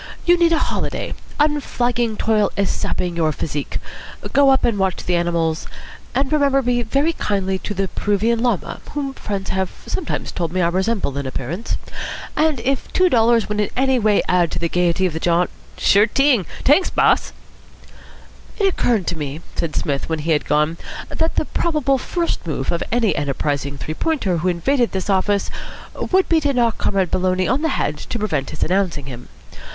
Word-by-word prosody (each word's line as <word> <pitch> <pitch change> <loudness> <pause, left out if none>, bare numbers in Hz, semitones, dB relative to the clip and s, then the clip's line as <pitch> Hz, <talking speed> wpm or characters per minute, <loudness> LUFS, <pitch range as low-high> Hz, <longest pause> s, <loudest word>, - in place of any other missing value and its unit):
You 350 0 +6
need 340 -1 +3
a 330 - +4
holiday. - - -2 0.3
Unflagging 245 -6 +1
toil 215 -2 +2
is 200 -1 +1
sapping 175 -1 -2
your 160 -2 +2
physique. 145 -1 -4 0.6
Go 280 0 +6
up 265 0 +4
and 220 -4 +1
watch 190 -2 0
the 180 - +1
animals, 170 -2 0 0.5
and 270 +2 +1
remember 280 -2 +3
me 245 0 +1
very 275 +8 +1
kindly 190 -7 -1
to 205 - -5
the 195 +1 0
Peruvian 215 +5 0
Llama, 240 -7 -1
whom 280 -2 -2
friends 200 -6 -4
have 190 -1 0 0.2
sometimes 350 - -3
told 170 -3 -2
me 185 - -1
I 170 -1 +3
resemble 190 -4 0
in 140 - -3
appearance. 145 - -3 0.6
And 310 -4 +2
if 265 +2 -1
two 370 0 +4
dollars 230 -3 +3
would 210 0 -2
in 210 - +1
any 265 -1 +3
way 215 -2 +3
add 175 -2 +3
to - - -2
the 170 -1 -1
gaiety 180 +2 +1
of 180 - 0
the 160 - -3
jaunt.. 175 +1 +2 0.2
." - - -24
"Sure 205 +2 +5
t'ing. 255 - +3 0.2
T'anks, 300 +7 +4
boss." - - +2 1.3
"It 405 - +2
occurred 235 - +1
to 175 - -1
me," 145 +2 -4
said 165 -3 -2
Psmith, 140 +1 -1
when 160 - 0
he 165 - +1
had 150 - +2
gone, 150 +2 +2 0.3
"that 320 0 -1
the - - +1
probable 295 -6 +1
first 340 - -2
move 135 -4 -2
of 170 - -1
any 230 -2 +2
enterprising 140 0 -2
Three 155 - -4
Pointer 215 - 0
who 170 +3 -1
invaded 240 +8 +1
this 190 +1 -1
office 200 +1 +1 0.4
would 375 0 +1
be 330 - +4
to 285 -1 +1
knock 235 -3 +1
Comrade 190 -4 0
Maloney 185 0 +1
on 260 +5 +1
the 320 - +1
head 150 - -1
to 235 - -5
prevent 160 -11 -1
his - - -3
announcing 180 -5 0
him. 125 -2 -9
200 Hz, 190 wpm, -20 LUFS, 170-265 Hz, 1.3 s, You